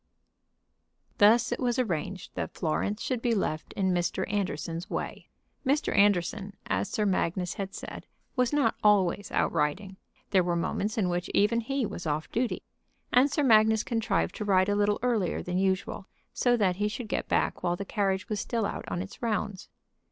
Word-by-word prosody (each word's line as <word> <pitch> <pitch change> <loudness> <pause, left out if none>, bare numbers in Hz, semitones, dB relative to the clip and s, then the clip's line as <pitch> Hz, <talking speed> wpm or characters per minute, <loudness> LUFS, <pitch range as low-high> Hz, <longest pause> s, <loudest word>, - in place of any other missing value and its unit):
Thus 225 +3 +5
it - - -1
was 245 -1 0
arranged 190 -5 -2
that - - -4
Florence 200 +6 -1
should 250 -3 -1
be 235 -1 +1
left 155 -6 -2
in 190 -2 +1
Mr. 175 -1 0
Anderson's 170 -3 -2
way. - - -5 0.3
Mr. 285 +2 +1
Anderson, 200 0 +2
as - - -1
Sir 210 - 0
Magnus 180 -2 0
had 195 -1 -5
said, - - -8 0.3
was 250 -1 +2
not 295 -1 +2
always 205 -1 +3
out - - +1
riding. 175 +5 -1 0.3
There 190 -2 +4
were 175 0 0
moments 205 +5 -1
in 200 -4 +2
which 175 0 -2
even 225 +3 +3
he 270 +2 -1
was 185 -5 -5
off 155 +1 -2
duty. 240 +1 -1 0.5
And 255 +3 +6
Sir 295 0 +1
Magnus 220 -3 +5
contrived 225 -2 0
to - - -3
ride 190 -1 +3
a 205 - +2
little 205 0 +2
earlier 225 -8 0
than 180 +1 -1
usual 190 0 -1 0.3
so 245 -1 +2
that 185 -5 +2
he 210 +1 +1
should 220 +2 -5
get - - -2
back - - 0
while 175 0 +1
the 200 - -5
carriage 195 -1 -1
was 215 -3 -2
still 230 -1 -1
out - - -4
on 175 - -2
its 195 - -12
rounds. 210 -4 -2
205 Hz, 180 wpm, -28 LUFS, 185-225 Hz, 0.5 s, And